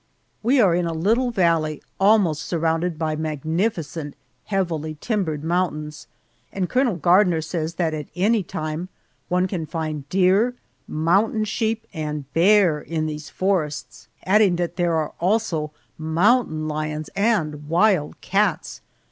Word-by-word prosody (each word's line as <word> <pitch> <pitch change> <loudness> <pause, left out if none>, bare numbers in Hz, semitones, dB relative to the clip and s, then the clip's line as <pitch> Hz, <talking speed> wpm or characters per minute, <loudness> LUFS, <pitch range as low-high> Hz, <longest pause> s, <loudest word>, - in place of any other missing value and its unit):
We 255 +5 +3
are 195 -7 +5
in 175 0 +1
a 165 - -3
little 225 +10 +2
valley 165 -8 +1 0.2
almost 195 -6 +4
surrounded 165 0 -1
by 155 -1 -1
magnificent, 160 0 -2 0.3
heavily 165 -6 -2
timbered 175 -10 -2
mountains, 155 -3 -2 0.4
and 190 -2 -2
Colonel 250 -3 +1
Gardner 175 +1 +3
says 160 0 -3
that 165 -3 0
at 150 -1 -5
any 210 +4 +2
time 155 0 -5 0.4
one 180 +1 +2
can 175 -5 -4
find 155 -4 -4
deer, 195 +6 +3 0.3
mountain 195 +8 +1
sheep, 225 +1 -1
and 150 -2 -4
bear 180 -2 +4
in 160 -1 -3
these 150 -1 -5
forests, 180 -6 -2 0.2
adding 200 -1 +4
that 175 0 -2
there 175 -2 +1
are 155 -1 -1
also 175 -5 0 0.3
mountain 160 0 +2
lions 155 0 -3
and 155 -9 0
wild 175 -3 +2
cats! 195 -2 0
170 Hz, 130 wpm, -22 LUFS, 155-195 Hz, 0.4 s, are